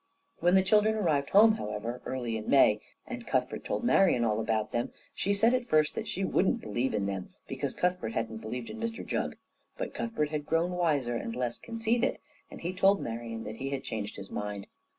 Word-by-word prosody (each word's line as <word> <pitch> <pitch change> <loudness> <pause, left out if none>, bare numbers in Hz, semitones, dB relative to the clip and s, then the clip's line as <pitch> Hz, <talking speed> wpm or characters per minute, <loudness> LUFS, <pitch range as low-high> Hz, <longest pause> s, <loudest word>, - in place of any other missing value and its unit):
When 175 +2 +4
the 190 - +6
children 215 +3 +4
arrived 155 -9 +1
home, 220 +2 +7
however, 105 +4 -4
early 120 -3 -2
in 110 -1 -4
May, 105 -6 +5 0.2
and 245 -2 -7
Cuthbert - - 0
told - - -2
Marian 190 - +4
all 110 -1 +1
about 110 -1 0
them, 120 0 -1 0.2
she 200 - -1
said 225 +4 +4
at 250 -1 0
first 155 -1 +3
that 220 - -4
she 195 -1 -1
wouldn't 185 - +2
believe 120 +3 -1
in 100 -2 0
them, 95 -2 -3 0.2
because - - -3
Cuthbert 180 -11 0
hadn't 110 -1 -2
believed 120 +2 -5
in 225 - -8
Mr 230 0 -3
Jugg. - - -2 0.4
But - - -4
Cuthbert 190 -11 -1
had 150 -1 -3
grown 165 +2 +2
wiser 150 -9 +1
and 115 0 -3
less 125 -1 -2
conceited, 230 +2 0 0.3
and - - -10
he 175 +2 -2
told 195 +1 +4
Marian 115 -1 -5
that 110 0 -6
he 135 +2 -3
had 140 -1 -3
changed 105 -1 -4
his 100 -1 -9
mind. 105 -1 -4
140 Hz, 205 wpm, -30 LUFS, -, 0.4 s, home